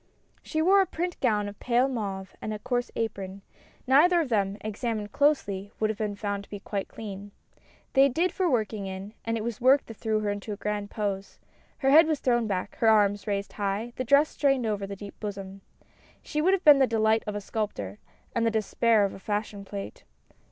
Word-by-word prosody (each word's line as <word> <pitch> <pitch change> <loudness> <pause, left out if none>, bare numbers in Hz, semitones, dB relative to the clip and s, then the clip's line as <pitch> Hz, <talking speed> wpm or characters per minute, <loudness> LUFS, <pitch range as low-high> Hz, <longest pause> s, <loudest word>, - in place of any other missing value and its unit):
She 315 -1 -1
wore 390 +3 +6
a 380 - +1
print 350 +1 -3
gown 210 -5 +1
of 205 0 -9
pale 245 +2 +2
mauve 200 -7 -4
and 215 - -4
a 215 - -3
coarse 245 +3 -2
apron; 195 -3 -4 0.4
neither 325 +7 +5
of 310 -6 -1
them, 200 -3 +1
examined 215 -1 -3
closely, 205 -10 +1
would 215 0 +2
have 215 - -7
been 210 -2 -2
found 200 -1 -3
to - - -18
be 205 - -6
quite 200 -1 -4
clean. 205 -2 -8 0.6
They 275 0 +6
did 335 +8 +1
for 370 -2 0
working 215 -5 -1
in, 190 +2 -7
and 230 0 0
it 215 - -3
was 235 -1 -4
the - - -12
work 265 +2 +5
that 225 - -10
threw 220 -1 0
her 205 -1 0
into 205 +1 -5
a - - -7
grand 205 0 -3
pose. 200 -2 -3 0.4
Her 270 -2 +2
head 315 +3 +8
was 310 -3 0
thrown 240 -3 +1
back, 190 -1 -3
her 225 - +2
arms 205 -1 +3
raised 200 -1 -2
high, 205 +3 -2
the 255 - -2
dress 280 +5 +4
strained 275 -4 +1
over 205 -2 -2
the 200 - -6
deep 200 +1 -10
bosom. 195 -2 -6 0.6
She 300 - -2
would 370 +5 +4
have 385 - -6
been 295 -2 +9
the 265 - +5
delight 220 -1 +2
of 210 - -3
a - - -1
sculptor, 195 - -4 0.3
and 235 - 0
the 230 - +3
despair 220 0 +2
of 195 - -3
a - - -10
fashion 205 0 -3
plate. 195 0 -7
215 Hz, 215 wpm, -27 LUFS, 200-255 Hz, 0.6 s, been